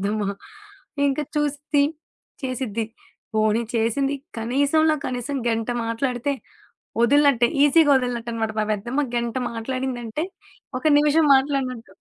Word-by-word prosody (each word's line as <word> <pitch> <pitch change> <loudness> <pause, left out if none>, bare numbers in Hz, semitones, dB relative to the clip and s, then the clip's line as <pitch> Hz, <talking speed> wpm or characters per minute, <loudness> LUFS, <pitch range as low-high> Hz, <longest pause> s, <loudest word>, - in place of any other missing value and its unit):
పెద్దమ్మ. 205 0 -1 0.8
ఇంకా 275 +2 0
చూసిద్ది, 290 0 +1 0.6
చేసిద్ది. 230 -4 -2 0.5
పోనీ 215 +1 +2
చేసింది 250 +5 +1 0.2
కనీసంలో 285 +7 +2
కనీసం 255 +2 -3
గంట 225 0 -1 0.2
మాట్లాడితే, 245 +3 -1 0.7
వదిలినట్టే 280 -1 +5 0.2
ఈజీగా 295 0 +5
వదిలినట్టనమాట. 235 -3 -2
మా - - +1
పెద్దమ్మా 240 +8 -1
గంట 235 0 -2 0.2
మాట్లాడిందంటే 255 +3 -3 0.5
ఒక - - -14
నిమిషం 300 +2 +4
మాట్లాడినట్టు. 260 -7 -2
255 Hz, 100 wpm, -23 LUFS, 230-285 Hz, 0.8 s, వదిలినట్టే